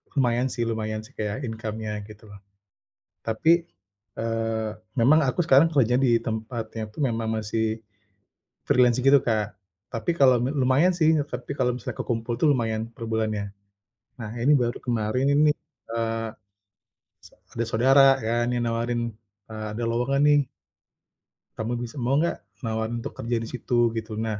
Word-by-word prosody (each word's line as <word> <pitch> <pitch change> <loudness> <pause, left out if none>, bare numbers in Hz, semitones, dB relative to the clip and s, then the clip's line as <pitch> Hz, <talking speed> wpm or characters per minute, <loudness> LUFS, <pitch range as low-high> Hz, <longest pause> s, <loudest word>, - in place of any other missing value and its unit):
lumayan 125 -1 +2
sih 120 -2 -2
lumayan 110 -1 -2
sih 115 - -16
kayak 105 +6 -3
income-nya 110 -2 -4 0.2
gitu 105 0 -14
loh. 100 - -12 0.8
Tapi, 165 +10 +2 0.5
eee, 115 -1 -2 0.3
memang 145 +7 +5
aku 170 +6 0
sekarang 145 +3 +6
kerja 125 -5 +2
di 120 -3 +4
tempatnya 110 -1 -4
itu 105 - -19
memang 115 -1 -2
masih 110 +1 -2 0.8
freelance 125 -1 +4
gitu, 135 +1 +5
Kak, 105 -5 -1 0.4
tapi 115 +9 -1
kalau 130 -2 +6
lu 125 - 0
lumayan 135 +8 +4
sih, 160 0 +4 0.2
tapi 140 - -5
kalau 125 -3 +1
misalnya 125 -2 -6
kekumpul 115 0 -2
itu 125 - +1
lumayan 115 -3 -1
per 115 0 -8
bulannya. 110 -2 -2 0.7
Nah, 110 -2 -5
ini 145 - +4
baru 120 0 0
kemarin 120 +1 0
ini, 150 +1 +5 0.5
eee, 115 -1 -1 1.0
s - - -16 0.2
ada 115 - -3
saudara 130 +5 +4 0.2
kan 120 +2 0
yang 120 - 0
nawarin, 120 +1 -1 0.5
eee, 110 0 -6
ada 115 +2 -4
lowongan 125 +4 +1
nih. 145 0 +5 1.2
Kamu 110 +2 -2
bisa 120 +3 -6
mau 125 +3 +1
gak, 170 - 0 0.2
nawarin 110 +1 -2
untuk - - -5
kerja 120 +1 -2
di 115 - -5
situ 120 -2 +1
gitu. 110 -1 -4
Nah, 110 -2 -2
115 Hz, 155 wpm, -25 LUFS, 110-130 Hz, 1.2 s, sekarang